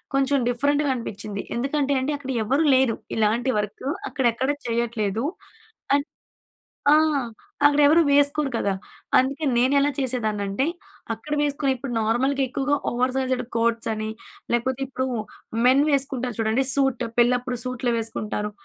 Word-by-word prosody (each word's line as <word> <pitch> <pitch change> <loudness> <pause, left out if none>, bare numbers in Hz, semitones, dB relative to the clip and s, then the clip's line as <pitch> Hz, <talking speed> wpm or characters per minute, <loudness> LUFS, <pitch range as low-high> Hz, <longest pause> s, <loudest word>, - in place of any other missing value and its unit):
కొంచెం 275 +1 +2
డిఫరెంట్‌గా 285 +4 +1
అనిపిచ్చింది. 210 -3 -5
ఎందుకంటే 280 +2 0
అండి 285 +3 -1
అక్కడ 270 -2 -6
ఎవరూ 275 +8 +2
లేరు 260 -3 +2 0.2
ఇలాంటి 225 +4 +2
వర్క్ 210 +5 -5 0.2
అక్కడెక్కడ 260 0 0 0.2
చేయట్లేదు. 230 -1 -1 0.7
అన్ 285 0 0 0.9
ఆ! - - +8 0.7
అక్కడ 290 0 +3
ఎవరు 315 +4 +6
వేసుకోరు 285 0 +3
కదా! 200 - 0 0.5
అందుకే 275 +4 0
నేనెలా 280 +3 +3
చేసేదాన్నంటే 220 -3 -1 0.5
అక్కడ 225 +7 -10
వేసుకుని 285 -1 0
ఇప్పుడు 255 0 -6
నార్మల్‍గా 260 +5 +1
ఎక్కువగా 275 +2 0
ఓవర్ 255 +1 0
సైజ్డ్ 255 -1 0
కోట్స్ 230 0 +1
అని 215 0 -4 0.4
లేకపోతే 245 +2 0
ఇప్పుడు 260 0 -2 0.6
మెన్ 265 +3 +5
వేసుకుంటారు 265 -4 -1
చూడండి 225 +4 +1
సూట్ 270 -3 +1 0.2
పెళ్ళప్పుడు 245 +1 +2
సూట్లు 255 -1 -1
వేసుకుంటారు. 215 -2 -3
255 Hz, 125 wpm, -24 LUFS, 230-275 Hz, 0.9 s, ఆ